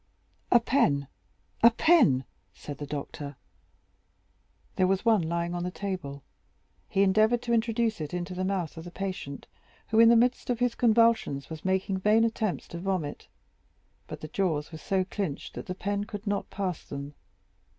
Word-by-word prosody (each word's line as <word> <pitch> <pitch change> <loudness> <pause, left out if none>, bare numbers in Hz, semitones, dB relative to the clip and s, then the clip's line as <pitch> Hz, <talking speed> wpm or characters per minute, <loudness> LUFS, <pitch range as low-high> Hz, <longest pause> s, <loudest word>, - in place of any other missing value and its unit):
"A 240 - +7
pen, 155 - +2 0.5
a 235 - +9
pen!" 230 - +4 0.3
said 145 - -8
the 145 - -5
doctor. 145 0 -6 1.4
There 185 - +3
was 195 +4 0
one 225 -4 +5
lying 170 +1 -2
on 175 - -2
the 180 - -2
table; 180 -8 -5 0.7
he 195 - +3
endeavored 215 +5 +3
to 235 - -1
introduce 225 -3 +1
it 150 - -4
into 180 +1 -4
the 185 +1 -3
mouth 185 -5 -2
of 165 - -7
the 175 - -8
patient, 185 -7 -5 0.4
who, 220 - +3
in 230 0 +8
the 235 - +7
midst 245 +2 +2
of 245 - +1
his 245 0 +1
convulsions, 230 - +2
was 160 -1 -7
making 190 0 0
vain 215 +3 +4
attempts 220 -4 -1
to 170 - -6
vomit; 180 -5 -3 0.8
but - - -8
the 155 - -6
jaws 160 -3 -1
were 160 - -8
so 190 +2 0
clenched 185 -6 -4
that - - -7
the 185 - -4
pen 200 +1 -2
could 205 -1 -7
not 200 -1 -2
pass 185 -4 -3
them. 140 +1 -7
190 Hz, 170 wpm, -28 LUFS, 160-220 Hz, 1.4 s, a